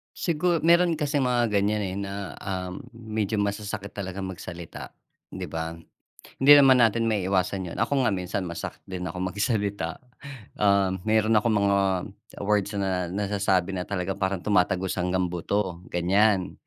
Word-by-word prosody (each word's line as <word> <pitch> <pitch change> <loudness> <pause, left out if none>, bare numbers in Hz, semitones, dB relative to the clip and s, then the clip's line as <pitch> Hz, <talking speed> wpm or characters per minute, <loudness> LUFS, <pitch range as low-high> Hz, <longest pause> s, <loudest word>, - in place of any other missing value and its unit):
Sigur 170 0 0
meron 170 0 +4
kasing 145 -3 0
mga 120 -2 +1
gan'yan, 105 +1 +1
eh, 95 -1 -3
na, 100 0 -4 0.3
ah, 90 -2 -4 0.2
medyo 110 -2 -3
masasakit 100 0 -2
talagang 95 -1 -6
magsalita, 85 -2 -9 0.4
'di - - -6
ba? 80 0 -4 0.6
Hindi 140 +2 +5
naman 135 -3 +7
natin 115 -1 +3
maiiwasan 95 -2 0
yun, - - -8
ako 130 +2 +1
nga 105 - +2
minsan 90 0 -3
masakit 85 -1 -6
din 95 -1 -6
akong 90 +2 -4
magsalita. 100 -3 -1 0.6
Um, 100 -2 +3
meron 110 0 +3
akong 110 +1 +3
mga, 100 -1 +3 0.7
words 105 0 +1
na, 95 -2 -1
na 100 +3 -2
nasasabi 95 -2 +1
na 90 +1 -4
talaga 95 -1 -2
parang 95 -2 -2
tumatagos 95 -2 +1
hanggang 90 +1 0
buto 90 0 -2
gan'yan. 95 +2 +2
100 Hz, 150 wpm, -26 LUFS, 95-110 Hz, 0.7 s, naman